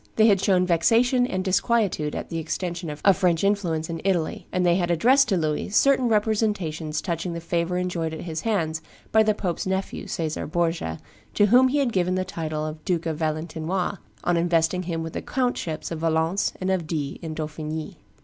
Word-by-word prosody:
They 220 - +5
had 200 -4 +4
shown 185 -3 +3
vexation 230 +9 +3
and 185 -5 -2
disquietude 190 -6 +1
at - - -5
the 165 - -3
extension 170 +1 -3
of 150 0 -7
French 175 -2 +1
influence 180 -6 0
in 165 -1 -5
Italy; 180 -4 -1
and 180 0 +1
they 175 - +5
had 175 -2 0
addressed 250 - +4
to 195 - +2
Louis 155 0 -1
certain 260 +4 +4
representations 205 -8 0
touching 170 -1 -2
the 170 - -4
favor 170 +1 -1
enjoyed 175 -3 -2
at 160 - -6
his 160 -2 -4
hands 160 -8 -1 0.3
by 220 - +5
the 215 -1 +2
pope's 180 -3 -3
nephew, 190 +1 -3
Caesar 160 -2 -3
Borgia, 165 - -1 0.4
to 205 - +5
whom 250 +5 +6
he 270 +3 0
had 265 -5 +1
given 185 -1 +1
the 185 0 -1
title 155 -4 -3
of 155 0 -6
Duke 170 -1 -1
of 160 -2 -2
Valentinois 160 +4 -2 0.2
on 175 -1 +2
investing 170 +1 +2
him 165 -2 -3
with 165 - -6
the - - -3
countships 245 -13 -2
of 165 - -3
Valence 165 +4 +1
and 190 0 -1
of 180 -4 -1
Die 145 -4 -3
in 160 -2 -5
Dauphiny. 155 0 -5
175 Hz, 195 wpm, -24 LUFS, 160-195 Hz, 0.4 s, whom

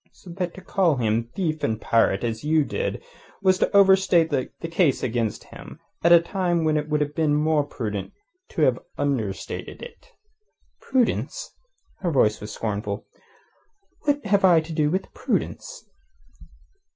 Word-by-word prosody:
So 180 - -13
that 180 -1 -4
to 190 - -10
call 180 -4 +1
him 115 -1 0
thief 160 -5 -2
and 110 -1 0
pirate 115 -3 +2
as 115 0 -3
you 155 +1 +3
did 475 - -3 0.4
was 185 -1 +4
to - - +2
overstate 190 -4 +5
the 135 -3 -1 0.2
case 165 -4 +1
against 115 -3 -1
him - - -11 0.2
at 170 - +4
a 170 - +9
time 175 -1 -1
when 155 -1 +2
it 150 0 -1
would 150 0 +1
have 145 0 -1
been 150 -1 +1
more 150 0 +2
prudent 105 -8 -5 0.4
to - - -1
have - - +3 0.2
understated 115 -9 -3
it." 480 - -13 0.7
"Prudence?" 260 - -1 0.5
Her 180 - -1
voice 110 -8 +2
was 105 0 -7
scornful. 105 -2 -4 0.9
"What 290 -3 -1
have 200 -1 +2
I 175 -3 +6
to 160 +1 -8
do 150 -1 +1
with 185 +4 -3
prudence?" - - -3
155 Hz, 155 wpm, -24 LUFS, 120-185 Hz, 0.9 s, a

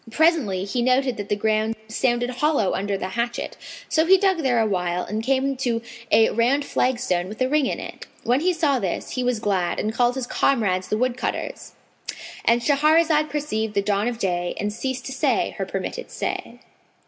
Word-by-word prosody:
Presently 250 - +2
he 220 +5 -1
noted 255 0 +2
that 205 -1 -6
the 205 - +2
ground 215 +1 0
sounded 240 +2 0
hollow 255 -5 +1
under 200 0 -1
the 190 - -4
hatchet; 235 +3 -3 0.3
so 315 - +3
he 385 +1 +7
dug 380 -2 +2
there 255 -6 +2
awhile 180 -5 0
and 215 +1 -3
came 270 +3 +1
to 240 -3 0 0.3
a 225 - +5
round 260 +5 +2
flagstone 240 -12 0
with 215 - -9
a 255 - +2
ring 290 0 +2
in - - -2
it. - - -8 0.2
When 245 +3 +2
he 360 +4 +2
saw 305 -6 +1
this, 190 -6 -3
he 255 - -2
was 245 -1 +1
glad 190 -5 0
and 215 - -1
called 245 +1 +2
his 260 -2 -2
comrades 200 -8 +1
the 215 - 0
woodcutters,—And 240 -1 -3
Shahrazad 305 +2 +3
perceived 220 -8 -2
the 200 - +2
dawn 205 +2 +1
of 245 -1 -2
day 175 -4 -1
and 205 0 -2
ceased 260 +2 -4
to - - -5
say 265 - +1
her - - -2
permitted - - -4
say. - - -4
240 Hz, 185 wpm, -23 LUFS, 210-275 Hz, 0.3 s, he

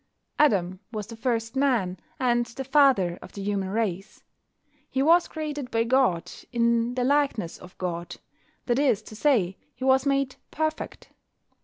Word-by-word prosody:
Adam 190 -10 +3
was 215 -3 -4
the 230 +2 -9
first 225 0 -2
man, 245 -10 +1 0.2
and 240 -2 +2
the 265 +4 -6
father 265 -11 +3
of - - -12
the 200 - -6
human 195 -2 -1
race. 195 -3 -3 0.7
He 265 - 0
was 335 +3 +5
created 295 -4 -5
by 230 -1 +1
God, 235 -8 +2 0.2
in 235 0 +1
the 250 - 0
likeness 275 - +1
of 180 - -14
God: 175 -2 -4 0.5
that 245 +1 +1
is 260 -8 +2
to 215 - -11
say, 210 -8 +2 0.2
he - - -8
was 265 +1 +4
made 275 -1 0
"perfect." 315 0 -3
240 Hz, 155 wpm, -26 LUFS, 200-275 Hz, 0.7 s, was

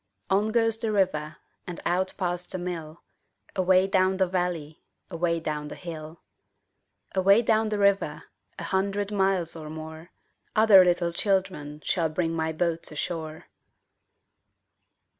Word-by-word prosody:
On 200 +3 +3
goes 225 -1 +2
the 225 -1 -1
river 175 -7 0 0.3
And 175 - -6
out 185 +2 0
past 180 -1 -2
the 185 - -1
mill, 170 -3 -6 0.5
Away 185 0 +4
down 190 -1 +2
the 190 - +3
valley, 175 -4 -3 0.3
Away 170 0 0
down 150 -2 -3
the - - -7
hill. 160 -2 -8 0.9
Away 195 +4 +5
down 220 -1 +2
the 210 - -1
river, 200 -1 +1 0.3
A - - -6
hundred 200 +1 -1
miles 190 -4 +1
or 155 -2 -8
more, 160 +2 -8 0.5
Other 215 -3 +8
little 175 -1 +1
children 185 -6 -1
Shall 170 -4 +1
bring 165 +1 -1
my 160 -1 -1
boats 165 0 -1
ashore. 155 0 -4
180 Hz, 135 wpm, -26 LUFS, 160-195 Hz, 0.9 s, Other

